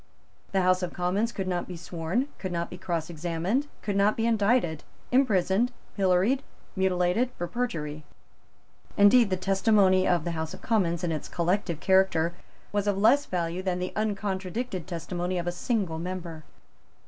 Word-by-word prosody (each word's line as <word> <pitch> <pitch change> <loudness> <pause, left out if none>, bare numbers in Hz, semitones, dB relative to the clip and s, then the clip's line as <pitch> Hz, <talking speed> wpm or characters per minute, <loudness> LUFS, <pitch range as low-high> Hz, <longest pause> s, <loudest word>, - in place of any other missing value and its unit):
The 190 -1 +2
House 185 0 +3
of 180 - -3
Commons 190 +6 0
could 195 -4 -4
not 180 -1 -2
be 180 - -7
sworn, 175 - -2
could 185 - -4
not 170 0 -3
be 180 - -7
cross 170 -3 -2
examined, 175 - -1 0.2
could 205 - -2
not 200 +2 +3
be 225 - +1
indicted, 210 -7 +2 0.3
imprisoned, 235 -2 +3 0.2
pilloried, 195 +7 +2 0.3
mutilated, 190 +5 +1
for 175 - -2
perjury. 160 -10 -3 0.9
Indeed 205 +2 +6
the 185 - 0
testimony 195 0 +3
of 175 -3 +2
the 170 - -2
House 160 -1 -4
of - - -14
Commons 180 -6 +1
in 170 - 0
its 155 -2 -4
collective 175 -1 0
character 190 -3 +3 0.4
was 205 0 0
of 200 -1 +1
less 240 +8 +4
value 175 0 -2
than 185 -1 -1
the 180 0 -4
uncontradicted 200 -2 -2
testimony 175 +1 -3
of 175 - -2
a 175 - 0
single 175 -3 -1
member. 170 -3 -6
185 Hz, 160 wpm, -27 LUFS, 175-205 Hz, 0.9 s, Indeed